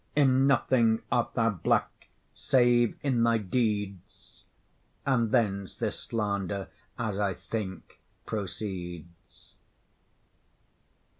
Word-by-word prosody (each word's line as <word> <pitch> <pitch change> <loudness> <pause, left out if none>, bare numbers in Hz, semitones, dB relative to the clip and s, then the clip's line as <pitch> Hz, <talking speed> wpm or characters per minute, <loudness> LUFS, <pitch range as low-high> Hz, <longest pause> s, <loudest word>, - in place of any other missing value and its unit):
In 135 -2 +4
nothing 115 -5 +3
art 120 -1 0
thou 115 -1 +3
black 90 - -1 0.3
save 120 -3 +3
in 130 -5 +1
thy 115 0 +4
deeds, 105 -3 -3 0.6
And 120 -5 +2
thence 100 -4 0
this - - -3
slander, 100 -3 -2 0.3
as 110 -4 -2
I 100 -3 0
think, 95 -5 -6 0.3
proceeds. 90 -5 -7
110 Hz, 90 wpm, -28 LUFS, 95-120 Hz, 0.6 s, In